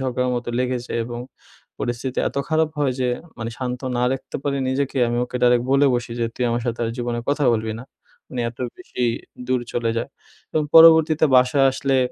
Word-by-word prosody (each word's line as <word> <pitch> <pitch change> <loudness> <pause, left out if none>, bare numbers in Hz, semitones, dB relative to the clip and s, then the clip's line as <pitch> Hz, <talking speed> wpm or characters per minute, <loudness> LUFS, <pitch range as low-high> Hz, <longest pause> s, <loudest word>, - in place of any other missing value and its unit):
ঝগড়ার 125 -1 -1
মতো 120 0 -4
লেগে 125 0 0
যাই - - -3
এবং 120 0 -6 0.6
পরিস্থিতি 120 +2 -3
এত - - -13
খারাপ 160 0 +2
হয় 140 -3 +1
যে 125 - +1 0.3
মানে 115 0 -4
শান্ত 125 -1 -3 0.2
না - - +1
রাখতে 135 - -5
পারি 140 -1 0
নিজেকে, 135 0 -1
আমি 120 - -1
ওকে 125 0 -6
ডাইরেক্ট 120 0 +4
বলে 140 +1 +5
বসি 120 -1 -3
যে, 115 - +1
"তুই 125 - -1
আমার 120 0 -1
সাথে 120 0 -2
আর 115 - -2
জীবনে 120 -1 -2
কথা 145 0 +1
বলবি 110 0 -2
না", 125 - -9 0.4
মানে 125 - -4
এত 120 - -21 0.2
বেশি 125 -8 -4 0.4
দূর 130 -1 +1
চলে 115 -1 0
যায় 115 - -2 0.4
এবং 155 - +1
পরবর্তীতে 160 -1 +7
বাসায় 130 +2 +4
আসলে 135 0 0
125 Hz, 200 wpm, -22 LUFS, 120-140 Hz, 0.6 s, পরবর্তীতে